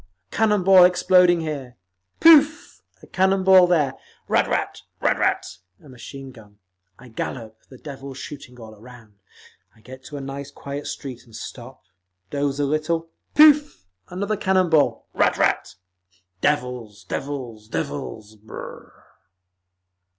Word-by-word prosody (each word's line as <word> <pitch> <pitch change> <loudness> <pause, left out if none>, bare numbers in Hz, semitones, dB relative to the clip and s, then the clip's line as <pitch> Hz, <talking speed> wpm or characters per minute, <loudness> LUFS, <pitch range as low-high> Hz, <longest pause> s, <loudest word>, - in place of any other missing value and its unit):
_ - - -30 0.3
a - - -7
cannon 210 -3 +2
ball 190 -1 +7
exploding 180 -1 +4
here, 140 -6 -6 0.4
pooff! 305 -2 +5 0.2
a - - -11
cannon 190 0 +1
ball 185 -1 +7
there, 150 -7 +1 0.3
ratt - - 0 0.3
ratt! - - -1 0.3
a - - -18
machine 135 +1 -10
gun…. 105 -4 -17 0.4
I 130 - -15
gallop, 110 -1 -6
the 130 - -13
devils 135 -1 -9
shooting 130 -3 -10
all 110 -1 -11
around. 115 0 -16 0.6
I 110 - -23
get 130 +3 -12
to 145 - -8
a - - -5
nice 135 +1 -7
quiet 140 +1 -7
street 130 -3 -7
and 115 -2 -16
stop, 130 +1 -10 0.5
doze 140 -1 -2
a 145 - +1
little, 165 +3 -2 0.2
pooff! 295 - +5 0.2
another 200 +4 -3
cannon 185 -3 +1
ball, 155 -2 +2
ratt - - +2
ratt…. - - 0 0.7
Devils! 125 -8 -2
Devils! 120 -1 -6
Devils! 110 -1 -6
Brrr!" 110 +1 -10
140 Hz, 135 wpm, -22 LUFS, 125-180 Hz, 0.7 s, ball